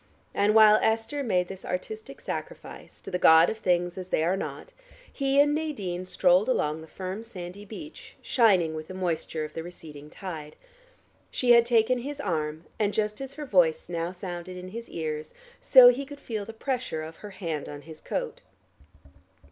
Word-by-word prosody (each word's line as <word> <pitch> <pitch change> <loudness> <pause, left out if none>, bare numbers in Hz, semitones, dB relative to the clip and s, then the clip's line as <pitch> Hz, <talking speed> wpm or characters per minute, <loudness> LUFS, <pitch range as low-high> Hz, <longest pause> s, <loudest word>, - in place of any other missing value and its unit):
And 210 +2 +2
while 215 -1 +8
Esther 225 +6 0
made 185 -8 +1
this 190 0 -9
artistic 435 - -6
sacrifice - - -7
to - - -9
the 180 - -1
god 160 0 +7
of 220 - -7
things 175 -2 0
as 185 - -7
they 160 - +1
are 175 +3 +2
not, 195 - -6 0.4
he 275 0 +1
and 290 +1 +5
Nadine 205 - -3
strolled 185 +3 +3
along 155 -10 0
the 160 - -11
firm 185 +4 -6
sandy 200 -3 -9
beach, 300 +10 -10
shining 190 -10 +3
with 155 0 -6
the 185 - -8
moisture 165 -3 -2
of 155 - -10
the 165 - -4
receding 155 -4 -11
tide. 155 -4 -8 0.7
She 245 -1 +2
had 235 0 +7
taken 240 +1 +3
his 285 +4 -6
arm, 155 - -2 0.2
and 205 -1 +1
just 210 +2 -1
as 270 0 -7
her 300 - -6
voice 175 - +2
now 170 0 -2
sounded 180 -1 -7
in 180 0 -8
his 230 +4 -8
ears, 155 -2 -5 0.2
so 255 -2 +9
he 250 +3 0
could 285 +1 -10
feel 215 -6 -4
the 225 - -7
pressure 240 - -3
of 160 +1 -9
her 210 - -9
hand 170 -6 -5
on 145 0 -8
his 160 -1 -11
coat. - - -4
190 Hz, 185 wpm, -27 LUFS, 170-235 Hz, 0.7 s, so